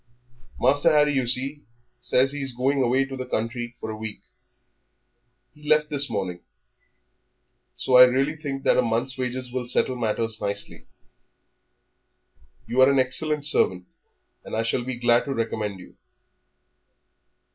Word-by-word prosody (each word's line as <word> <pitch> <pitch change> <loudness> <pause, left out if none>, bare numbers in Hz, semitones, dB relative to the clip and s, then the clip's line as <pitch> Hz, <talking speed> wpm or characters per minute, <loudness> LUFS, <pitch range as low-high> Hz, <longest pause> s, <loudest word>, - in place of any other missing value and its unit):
Master 145 +5 +3
Harry, 150 -1 +3
you 130 -3 0
see, 135 +4 -2 0.4
says 130 +2 +2
that 145 - -5
he - - -4
is 135 -2 -3
going 135 +3 0
away 130 +2 +2
to 135 0 -8
the 130 - -5
country 120 0 -4
for 110 - -5
a - - -6
week. 110 0 -6 1.3
He 150 +2 -11
left 150 0 +3
this 145 -1 +2
morning. 95 -5 -3 1.4
So 125 - +2
I 125 - +11
really 135 +4 0
think 140 -3 -6
that - - +3
a - - +5
month's 120 +3 -1
wages 125 0 -4
will 125 -2 -3
settle 130 +1 +1
matters 115 -1 -2
nicely. 100 0 -4 1.8
You 120 +3 +1
are 130 - +7
an 140 - +2
excellent 145 +3 +1
servant, 90 -10 +1 0.6
and - - -7
I 110 - 0
shall 115 +2 -1
be 130 +1 -4
glad 120 0 +2
to 135 -1 -3
recommend 110 -4 -3
you." 90 - -15
125 Hz, 155 wpm, -24 LUFS, 115-135 Hz, 1.8 s, I